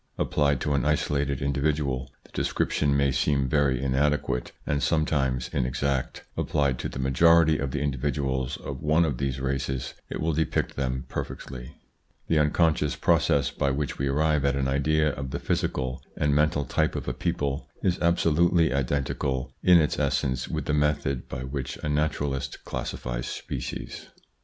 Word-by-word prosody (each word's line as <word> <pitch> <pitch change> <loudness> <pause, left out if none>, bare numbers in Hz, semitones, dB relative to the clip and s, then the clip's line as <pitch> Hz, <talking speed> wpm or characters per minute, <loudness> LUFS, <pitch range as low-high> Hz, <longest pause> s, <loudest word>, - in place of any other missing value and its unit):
Applied 70 -2 +1
to 75 - 0
an 70 - +1
isolated 70 -2 0
individual, 70 -2 0
the - - -21
description 70 -1 +1
may 70 -1 +3
seem 70 +1 +1
very 70 -2 +2
inadequate 70 -1 0
and 70 -1 0
sometimes 70 -6 +1
inexact; 65 0 -1
applied 70 -4 0
to - - -3
the - - -8
majority 80 +4 +4
of 70 - -1
the 70 +1 -2
individuals 65 -2 -1
of 70 -1 -7
one 80 +2 +3
of 70 -6 -2
these 70 -1 -1
races 65 0 -2 0.2
it - - -4
will 80 0 0
depict 80 +1 0
them 65 -1 -2
perfectly. 60 -2 -6 0.5
The 80 - +3
unconscious 75 -1 +2
pro - - +3
cess 70 - +1
by 70 - 0
which 70 +1 -2
we 70 - 0
arrive 75 +1 +2
at 70 0 +2
an 70 -1 0
idea 75 +3 +2
of 65 -1 -4
the 70 - -3
physical 65 0 -1 0.2
and 75 -1 +2
mental 75 -1 +2
type - - 0
of - - -4
a - - -1
people 70 -1 -2
is 90 0 +1
absolutely 85 -2 +3
identical 65 -1 -1
in 90 -1 +7
its 75 - +1
essence 65 -2 0
with - - -3
the 75 - 0
method 75 -3 0
by 65 - -5
which 65 0 -4
a 75 - -1
naturalist 75 -2 -1
classifies - - -4
species. - - -5
70 Hz, 160 wpm, -26 LUFS, 65-75 Hz, 0.5 s, in